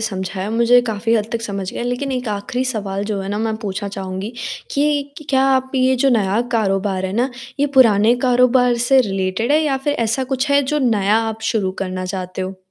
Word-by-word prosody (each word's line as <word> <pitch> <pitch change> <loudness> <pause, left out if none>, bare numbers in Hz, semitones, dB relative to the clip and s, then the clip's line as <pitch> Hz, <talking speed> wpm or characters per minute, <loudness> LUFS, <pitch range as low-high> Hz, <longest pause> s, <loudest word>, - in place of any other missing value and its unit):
समझाया। 190 0 -4
मुझे 235 +2 +4
काफ़ी 225 +2 0
हद 215 -1 0
तक 230 -1 -2
समझ 195 -4 -4
गया, - - -4
लेकिन 245 +3 -2
एक 250 -2 -3
आखिरी 210 +5 -2
सवाल 205 -5 -3
जो 205 -2 -2
है 195 - -5
ना 205 +1 -2
मैं 220 0 -1
पूछना 200 0 -3
चाहूँगी, 190 +3 -5 0.4
कि 285 +1 +1
इक 285 +2 -11
क्या 265 0 +3
आप 260 0 -1
ये 260 0 +3
जो - - +5
नया 210 -2 +2
कारोबार 195 -3 0
है 190 - -3
ना, 245 +5 0 0.3
ये 290 - +3
पुराने 225 -2 +5
कारोबार 250 0 +4
से 270 -1 +6
रिलेटेड 195 +5 -1
है, 310 - +4
या 280 -3 +1
फ़िर 285 +2 -1
ऐसा 235 +1 0
कुछ 265 +3 -1
है 280 0 +4
जो 300 - +2
नया 215 -5 +2
आप 220 0 -6
शुरू 200 -4 0
करना 185 -1 -4
चाहते 185 0 -4
हो? 190 0 -5
225 Hz, 210 wpm, -19 LUFS, 195-255 Hz, 0.4 s, से